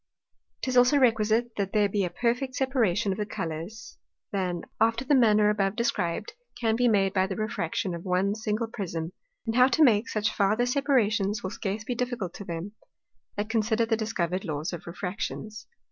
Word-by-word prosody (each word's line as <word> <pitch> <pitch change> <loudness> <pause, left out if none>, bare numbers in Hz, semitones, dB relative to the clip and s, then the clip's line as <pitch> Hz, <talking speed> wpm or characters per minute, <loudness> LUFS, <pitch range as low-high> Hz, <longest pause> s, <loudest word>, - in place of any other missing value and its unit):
'Tis 255 -1 -1
also 250 +3 +6
requisite, 230 -2 +3
that 195 -1 -2
there 210 -1 +4
be 200 0 0
a 180 - -1
perfecter 245 +7 -1
separation 230 -7 +1
of 190 - -3
the 210 - 0
Colours, 170 +8 -6 0.3
than, 180 -3 -2 0.2
after 230 +3 +2
the 290 - +2
manner 215 -5 +5
above 195 -1 0
described, 235 - -1 0.3
can 225 -2 +1
be 245 +1 +3
made 195 -4 +3
by 190 -1 +2
the 190 - -4
Refraction 190 -3 -2
of 170 0 -6
one 190 +2 +1
single 215 +1 -2
Prism; 175 -7 -4 0.3
and 225 -1 -2
how 255 +1 +7
to 310 +4 +3
make 225 -5 +4
such 215 0 0
farther 215 +4 +2
separations, 225 -7 +1
will 190 - -3
scarce 210 0 -3
be 245 - -2
difficult 240 -7 -3
to - - -8
them, 170 +1 -5 0.6
that 205 +1 -2
consider 225 0 +2
the 225 0 +1
discovered 190 -5 -2
Laws 155 -1 -3
of 175 - -7
Refractions. 205 +5 -5
215 Hz, 180 wpm, -27 LUFS, 190-235 Hz, 0.6 s, how